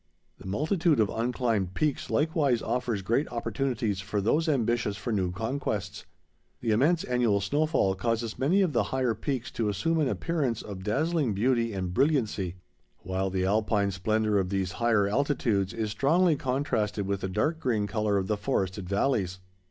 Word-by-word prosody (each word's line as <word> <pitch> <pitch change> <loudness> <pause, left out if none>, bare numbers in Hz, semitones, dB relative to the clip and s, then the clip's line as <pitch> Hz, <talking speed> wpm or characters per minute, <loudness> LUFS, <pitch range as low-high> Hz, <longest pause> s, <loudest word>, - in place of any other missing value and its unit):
The - - -10
multitude 155 - +1
of 105 -3 +3
unclimbed 115 -5 -1
peaks 150 -3 -1
likewise 145 -1 +1
offers 120 -3 -1
great 120 +9 +1
opportunities 115 -3 -2
for 105 +1 -2
those 150 - +1
ambitious 120 -6 0
for 105 +4 -3
new 95 -3 0
conquests. 105 -2 -3 0.5
The 115 - -1
immense 150 +10 +3
annual 120 -5 +2
snowfall 145 - +1
causes 115 +3 -2
many 165 +10 +3
of 170 -5 0
the - - +2
higher 130 -3 +1
peaks 120 +3 -3
to 110 -3 -1
assume 165 - 0
an 150 - +2
appearance 140 -9 -1
of 100 -3 -7
dazzling 140 - 0
beauty 115 +2 +1
and 95 -3 -3
brilliancy, 110 - +1 0.5
while 95 +1 -1
the 95 0 -1
Alpine 105 0 +1
splendor 105 +2 +1
of 95 -1 -1
these 95 -2 -1
higher 115 -4 +3
altitudes 110 -5 +1
is 110 -2 -3
strongly 160 - +3
contrasted 125 -7 -1
with 100 0 -2
the 95 - -2
dark 150 - 0
green 115 -8 0
color 105 -1 0
of 95 - 0
the 105 +2 -1
forested 95 -5 -2
valleys. 100 -4 0
110 Hz, 165 wpm, -28 LUFS, 100-135 Hz, 0.5 s, of